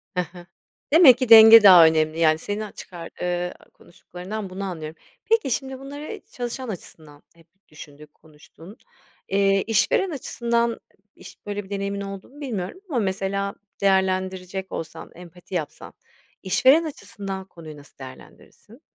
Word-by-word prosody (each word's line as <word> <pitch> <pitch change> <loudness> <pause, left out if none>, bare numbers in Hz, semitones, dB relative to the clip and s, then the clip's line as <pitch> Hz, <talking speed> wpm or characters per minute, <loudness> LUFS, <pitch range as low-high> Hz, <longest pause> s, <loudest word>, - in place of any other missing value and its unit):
He 180 - +1
he. 175 -1 -12 0.5
Demek 305 -7 +8
ki 255 -2 -3
denge 225 0 +10
daha 180 -4 +9
önemli. 160 0 +1
Yani 155 -1 +3
seni 205 +5 -5
a 205 - -11
çıkar, 170 -2 -10
eee, 180 0 -2 0.2
konuştuklarından 190 +4 -9
bunu 190 +2 -7
anlıyorum. 160 -4 -7 0.2
Peki, 445 - +1
şimdi 265 +1 -3
bunları 290 +9 -9
çalışan 245 +1 -6
açısından 155 -6 -11
hep 165 -1 -23 0.2
düşündük, 150 0 -14
konuştun, 160 +6 -17 0.5
eee, 195 0 +2
işveren 380 - +1
açısından 235 -4 -2 0.4
iş - - -14
böyle 205 0 -5
bir 190 - -17
deneyimin 200 0 -4
olduğunu 195 +9 -9
bilmiyorum 220 - -5
ama 265 -6 -1
mesela 195 0 -2 0.3
değerlendirecek 190 -1 -1
olsan 160 0 -8
empati 180 +1 -12
yapsan 155 -4 -6 0.5
işveren 260 - +4
açısından 205 -11 -7
konuyu 160 -5 -12
nasıl 145 0 -18
değerlendirirsin? 140 - -15
195 Hz, 135 wpm, -23 LUFS, 175-230 Hz, 0.5 s, denge